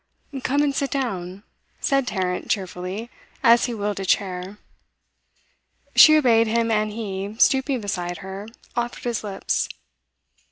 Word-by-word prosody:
'Come 280 +3 +1
and 285 -1 +1
sit 275 0 -1
down,' 195 -8 -3 0.4
said 275 -2 +1
Tarrant 185 -4 -2
cheerfully, 190 +3 -3 0.3
as 235 -1 +6
he 245 - -3
wheeled 205 -1 -2
a - - -3
chair. 185 0 -1 1.4
She 310 0 +9
obeyed 230 -6 +4
him, 230 +1 +1
and 215 -1 +1
he, 205 -2 -5
stooping 265 0 +3
beside 175 -3 -3
her, 195 +2 -7 0.3
offered 240 0 -3
his 235 -3 -2
lips. 200 -2 -2
215 Hz, 130 wpm, -23 LUFS, 190-245 Hz, 1.4 s, She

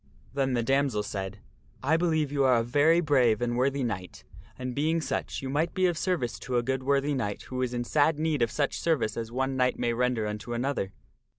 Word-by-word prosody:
Then 135 -2 0
the 120 -1 +1
damoiselle 135 -4 +1
said, 95 0 -5 0.2
" - - -29
I 150 +4 +3
believe 160 -4 +1
you 140 -1 +1
are 130 -2 +5
a 115 - +2
very 145 +8 +4
brave 130 -8 +3
and 120 0 -1
worthy 135 +2 +1
knight, 95 -6 -4 0.3
and 125 -1 -4
being 155 +5 +1
such 155 - -3
you 130 - -3
might 155 +4 0
be 185 - +2
of 175 -2 +2
service 160 -8 -1
to 125 0 -2
a 120 - +1
good 130 +1 -1
worthy 140 +2 +1
knight 105 -7 -2
who 130 0 -4
is 125 -1 0
in 120 0 -2
sad 150 +4 +2
need 155 -3 0
of 115 - +3
such 145 +2 -1
service 160 -9 0
as 115 -1 -4
one 130 +2 -1
knight 125 -1 +2
may 120 - 0
render 125 -2 0
unto 105 +2 -4
another." 120 -5 -1
130 Hz, 225 wpm, -28 LUFS, 120-145 Hz, 0.3 s, are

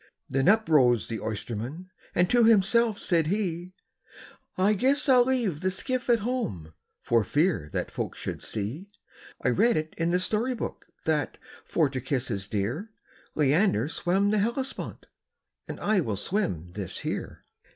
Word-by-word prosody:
Then 135 +3 0
up 220 +1 +4
arose 125 -7 +4
the 115 -2 -3
oysterman, 120 - -5 0.2
and 175 +1 +4
to 240 +3 +4
himself 225 0 +4
said 165 -5 +1
he, 180 -2 -2 0.8
"I 195 +3 +4
guess 270 +8 +2
I 260 -2 +6
'll 245 - +6
leave 240 - 0
the 185 - +1
skiff 250 +7 -3
at 235 -2 +4
home, 100 - -3 0.3
for 115 -2 +3
fear 145 - +1
that - - -2
folks - - -4
should - - -5
see 120 - -4 0.6
I - - +5
read 220 - +3
it 155 0 -3
in 165 0 +1
the 180 +1 +2
story 225 +7 0
book, - - -6 0.2
that, 155 -2 0 0.3
for 160 -3 +2
to 130 -1 -4
kiss 130 0 -1
his 100 -3 -3
dear, 115 - -2 0.5
Leander 150 - +3
swam 190 +5 +1
the 215 - +2
Hellespont, 255 +6 -2 0.6
and - - -6
I 210 -1 +2
will 110 - -1
swim 100 - -1
this 95 0 -5
here." - - -5
175 Hz, 160 wpm, -27 LUFS, -, 0.8 s, I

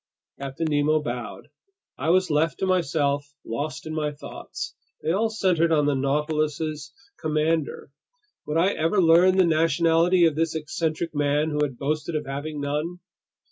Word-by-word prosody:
Captain 140 +4 -4
Nemo 150 +1 +2
bowed. 120 -4 -6 0.5
I 160 - -2
was 185 0 +3
left 150 +1 +1
to - - -1
myself, 145 -6 0
lost 145 +7 -4
in 155 - -5
my 150 -1 -1
thoughts. 145 - -7 0.3
They 160 - +1
all 215 +5 +1
centered 180 -6 +1
on 150 -2 +3
the 145 - +2
Nautilus's 150 +1 -1 0.3
commander. 155 -2 -1 0.6
Would 150 - -1
I 175 +4 +4
ever 165 +2 +1
learn 180 +2 +5
the 185 - +6
nationality 165 +2 +3
of 160 - +3
this 160 +1 -1
eccentric 160 +1 -2
man 145 +1 +1
who 150 - -1
had 135 -4 -1
boasted 155 +4 -2
of 150 - -2
having 145 +2 -5
none? 150 +5 -3
155 Hz, 155 wpm, -25 LUFS, 145-165 Hz, 0.6 s, the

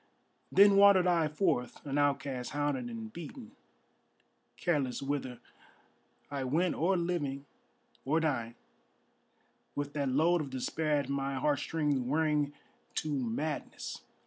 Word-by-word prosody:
Then 200 0 +7
wandered 200 -2 +7
I 170 -3 +3
forth 150 -7 -1
an 140 0 -1
outcast 140 -3 0
hounded 145 -3 -1
and 110 -2 -7
beaten; 225 - -9 1.1
Careless 140 -7 0
whither 135 -3 -3 0.9
I 140 -2 -2
went 160 +8 +1
or 185 +4 +1
living 150 -6 -2 0.6
or 155 +4 +2
dying, 120 -8 -1 1.2
With 145 0 -3
that 140 -2 0
load 165 +6 +3
of 145 - -5
despair 150 +4 0
at 140 -2 -1
my 140 0 -1
heartstrings 145 +1 0
wearing 150 +2 +1 0.4
to 155 -1 -1
madness. 140 +4 -3
145 Hz, 120 wpm, -32 LUFS, 135-160 Hz, 1.2 s, Then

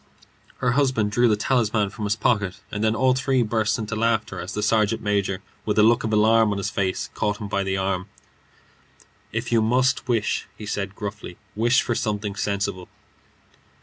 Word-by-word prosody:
Her 125 -2 +1
husband 130 -6 +1
drew 120 +3 +3
the 110 - +3
talisman 110 -3 +1
from 105 0 -4
pocket, 100 -5 +1
and 105 +1 -3
then 110 0 +2
all 130 +3 +3
three 130 -1 +1
burst 110 -1 0
into 110 -1 -4
laughter 110 0 0
as 90 - -6
the 105 - -2
sergeant 110 +1 +2
major, 100 -2 -1 0.2
with 105 -1 -1
a 105 - +6
look 115 +1 +4
of 110 - -2
alarm 110 0 +4
on 100 - -1
his 100 0 -2
face, 95 -2 -2
caught 105 -1 -1
him 105 - -5
by 100 0 -1
the 95 0 -1
arm. 95 0 -1 1.2
"If - - -3
you 115 -1 +4
must 130 +4 +1
wish," 115 -3 0
he 105 - -8
said, 100 -1 -3
gruffly, 100 -3 -7 0.2
"wish 120 +4 +3
for 120 - -1
something 105 -2 -2
sensible." 100 -2 -2
105 Hz, 180 wpm, -23 LUFS, 100-115 Hz, 1.2 s, a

